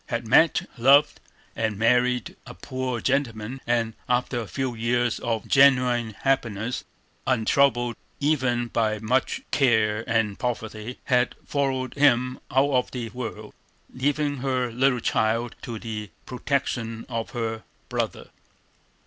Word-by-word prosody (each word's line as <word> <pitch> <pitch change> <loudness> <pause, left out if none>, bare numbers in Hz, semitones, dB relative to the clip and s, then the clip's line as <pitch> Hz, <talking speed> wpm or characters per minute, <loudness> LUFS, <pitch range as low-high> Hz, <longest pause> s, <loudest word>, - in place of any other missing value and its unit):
Had 115 0 -3
met, 160 +7 +4
loved, 140 +4 +5 0.4
and 110 -3 -1
married 125 +2 +2
a - - -9
poor 130 +4 -3
gentleman, 130 -2 -1
and, 115 -2 +1 0.2
after 125 0 +1
a 115 - -5
few 130 +1 -2
years 120 +1 0
of 115 -3 -2
genuine 125 -5 +4
happiness, 120 -4 -1 0.4
untroubled 120 0 +2 0.2
even 130 -5 +1
by 110 -2 0
much 115 +5 0
care 110 -5 +2
and 110 -3 +1
poverty, 115 -1 -4
had 125 -1 +1
followed 135 -3 -1
him 130 -3 +3
out 135 +2 +2
of 125 -2 +1
the 120 -3 -5
world, 110 -2 -7 0.4
leaving 145 +2 0
her 130 -2 -1
little 125 +1 +2
child 115 +2 0
to 115 -2 -6
the 105 -2 -6 0.2
protection 120 -3 -2
of 115 -2 -3
her 115 -2 -3 0.3
brother. - - -3
120 Hz, 125 wpm, -25 LUFS, 115-130 Hz, 0.4 s, loved